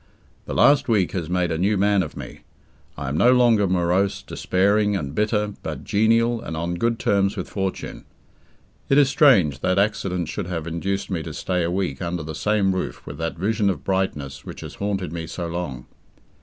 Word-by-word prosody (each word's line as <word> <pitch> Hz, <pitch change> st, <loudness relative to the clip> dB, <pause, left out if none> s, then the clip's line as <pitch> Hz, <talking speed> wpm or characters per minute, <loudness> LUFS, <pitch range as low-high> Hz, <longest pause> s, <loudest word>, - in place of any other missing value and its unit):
The -, -, -5 dB
last 145 Hz, 0 st, +5 dB
week 100 Hz, -6 st, +2 dB
has 85 Hz, -4 st, -4 dB
made 90 Hz, -1 st, 0 dB
a 80 Hz, -, -1 dB
new 100 Hz, +3 st, +2 dB
man 100 Hz, 0 st, +3 dB
of 80 Hz, -, -6 dB
me. -, -, -8 dB, 0.6 s
I 70 Hz, -1 st, -5 dB
am 70 Hz, -, -2 dB
no 120 Hz, +10 st, +5 dB
longer 115 Hz, -5 st, +4 dB
morose, 90 Hz, +2 st, +1 dB
despairing, 100 Hz, +2 st, +1 dB
and 70 Hz, -7 st, -3 dB
bitter, 105 Hz, +1 st, 0 dB
but -, -, -5 dB
genial, 115 Hz, +2 st, +2 dB
and 80 Hz, -, -5 dB
on 85 Hz, +2 st, -2 dB
good 115 Hz, +6 st, 0 dB
terms 100 Hz, 0 st, +1 dB
with 90 Hz, -, -4 dB
fortune. 95 Hz, -2 st, -4 dB, 0.8 s
It 135 Hz, -, +4 dB
is 140 Hz, -2 st, +5 dB
strange 120 Hz, -, +4 dB
that 90 Hz, +4 st, 0 dB
accident 95 Hz, -4 st, 0 dB
should 100 Hz, +1 st, -4 dB
have 85 Hz, -3 st, -4 dB
induced 95 Hz, +4 st, -3 dB
me 85 Hz, -4 st, -1 dB
to 80 Hz, -2 st, -7 dB
stay 90 Hz, +3 st, -1 dB
a 85 Hz, -, 0 dB
week 90 Hz, -6 st, -2 dB
under 85 Hz, -1 st, -3 dB
the 80 Hz, +1 st, -6 dB
same 100 Hz, +2 st, +1 dB
roof 95 Hz, -, -4 dB
with -, -, -8 dB
that 80 Hz, +1 st, -3 dB
vision 105 Hz, +3 st, +1 dB
of 95 Hz, -, -3 dB
brightness 75 Hz, -8 st, -2 dB
which -, -, -9 dB
has -, -, -8 dB
haunted 95 Hz, -5 st, -3 dB
me 80 Hz, -1 st, -5 dB
so 85 Hz, +1 st, -5 dB
long. 85 Hz, -8 st, -5 dB
95 Hz, 195 wpm, -23 LUFS, 85-105 Hz, 0.8 s, last